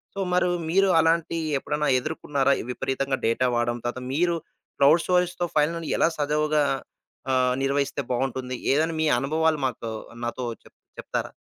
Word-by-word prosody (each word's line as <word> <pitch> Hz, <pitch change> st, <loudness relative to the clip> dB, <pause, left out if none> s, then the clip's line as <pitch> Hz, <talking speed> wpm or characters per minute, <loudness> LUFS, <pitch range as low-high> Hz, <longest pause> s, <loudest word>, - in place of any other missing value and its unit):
So 200 Hz, -, -5 dB
మరు 180 Hz, 0 st, +3 dB, 0.2 s
మీరు 195 Hz, +2 st, +3 dB
అలాంటి 165 Hz, 0 st, +2 dB, 0.2 s
ఎప్పుడన్నా 150 Hz, +2 st, -1 dB
ఎదుర్కున్నారా? 140 Hz, -1 st, 0 dB, 0.2 s
విపరీతంగా 135 Hz, +1 st, -1 dB
డేటా 115 Hz, +3 st, +2 dB
వాడం, 120 Hz, 0 st, 0 dB
తర్వాత 125 Hz, +1 st, -3 dB
మీరు 170 Hz, +3 st, +2 dB, 0.4 s
క్లౌడ్ 150 Hz, +4 st, +5 dB
స్టోరేజ్‌తో 180 Hz, -1 st, +1 dB
ఫైనలని 165 Hz, +2 st, +1 dB
ఎలా -, -, +4 dB
సజీవంగా? 150 Hz, +1 st, +2 dB, 0.7 s
ఆహ్, 125 Hz, -1 st, +3 dB
నిర్వహిస్తే 140 Hz, +1 st, 0 dB
బావుంటుంది. 130 Hz, 0 st, -2 dB, 0.2 s
ఏదన్నా 160 Hz, +3 st, +1 dB
మీ 160 Hz, -, +2 dB
అనుభవాలు 155 Hz, +3 st, +1 dB
మాతో 115 Hz, -3 st, -3 dB, 0.3 s
నాతో 120 Hz, +1 st, -3 dB, 0.2 s
చెప్ -, -, -20 dB, 0.2 s
చెప్తారా? -, -, -4 dB
150 Hz, 135 wpm, -25 LUFS, 130-165 Hz, 0.7 s, క్లౌడ్